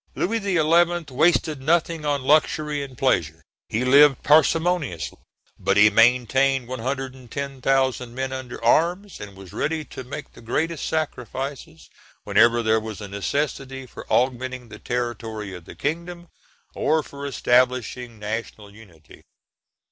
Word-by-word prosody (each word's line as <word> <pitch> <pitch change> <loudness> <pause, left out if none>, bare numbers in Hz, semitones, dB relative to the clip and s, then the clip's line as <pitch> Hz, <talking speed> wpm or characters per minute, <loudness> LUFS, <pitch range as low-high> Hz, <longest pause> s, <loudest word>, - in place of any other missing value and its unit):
Louis 225 +5 0
XI. 175 -4 +2
wasted 155 0 +2
nothing 165 +1 +1
on 140 -2 0
luxury 150 +1 +2
and 135 -3 -8
pleasure; 80 - 0 0.3
he 115 +4 -1
lived 140 +1 +6
parsimoniously, 155 - +2 0.4
but - - +1
he 105 +1 +7
maintained 125 +3 +3
110,000 130 0 -2
men 130 0 -3
under 130 -3 -7
arms, 175 - +2
and 100 -1 -9
was 95 -1 -12
ready 155 +6 -2
to 130 - -9
make 140 +4 -8
the - - -14
greatest 155 +8 -2
sacrifices 135 -3 -4 0.4
whenever 120 0 +4
there 110 0 +3
was 110 -1 -7
a 105 - -7
necessity 135 - -3
for 125 - -12
augmenting 130 -1 0
the - - -11
territory 115 -4 -4
of 90 -2 -10
the - - -11
kingdom, 170 +3 -4 0.4
or 155 +1 +1
for 140 0 -8
establishing 125 -2 +1
national 105 -1 -6
unity. 90 -8 -17
130 Hz, 130 wpm, -23 LUFS, 115-150 Hz, 0.4 s, he